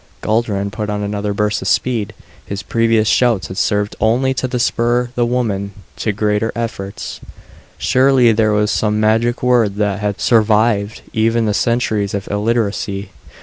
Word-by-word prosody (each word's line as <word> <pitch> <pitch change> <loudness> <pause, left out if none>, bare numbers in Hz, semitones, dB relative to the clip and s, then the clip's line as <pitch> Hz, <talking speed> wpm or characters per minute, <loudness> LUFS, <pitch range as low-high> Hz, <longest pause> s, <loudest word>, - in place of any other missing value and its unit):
Guldran 105 -3 -1
put 105 0 -4
on 105 0 -2
another 105 0 -2
burst 105 0 -1
of 95 - -4
speed. 115 -1 0 0.3
His 100 -1 -6
previous 115 +1 +1
shouts 115 -4 +2
had 95 - -7
served 105 0 0
only 125 +5 +2
to 130 -1 -2
spur 120 0 +1
the 120 -1 +1
woman 105 -5 -1 0.2
to 105 - -1
greater 105 +1 0
efforts. 110 -4 -5 0.6
Surely 130 -2 +4
there 110 0 +2
was 105 0 +1
some 105 -1 0
magic 115 +3 +1
word 120 -5 +3
that 105 -1 -1
had 105 -1 -2
survived 110 -2 +2
even 115 +1 +1
the 105 - 0
centuries 110 -4 0
of 100 - -4
illiteracy. 105 -2 -1
110 Hz, 150 wpm, -17 LUFS, 105-120 Hz, 0.6 s, Surely